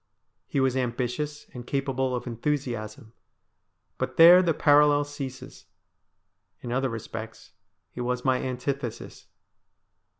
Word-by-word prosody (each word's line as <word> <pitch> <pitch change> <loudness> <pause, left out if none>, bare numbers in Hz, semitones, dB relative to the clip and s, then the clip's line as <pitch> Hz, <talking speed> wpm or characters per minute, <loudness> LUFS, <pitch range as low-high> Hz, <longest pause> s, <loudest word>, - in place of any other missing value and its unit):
He 140 - -1
was 130 -1 +2
ambitious 130 +4 -3
and 125 -1 -9
capable 130 -2 -1
of 125 - -5
enthusiasm; 120 -2 -4 0.9
but - - -3
there 175 +2 +9
the 175 -2 +1
parallel 145 0 +4
ceases; 135 -3 -8 0.9
in 120 - -6
other 130 +1 0
respects 115 0 -8 0.4
he 125 - -7
was 125 +1 -2
my 130 -1 +2
antithesis. 130 -1 -5
130 Hz, 110 wpm, -26 LUFS, 120-145 Hz, 0.9 s, there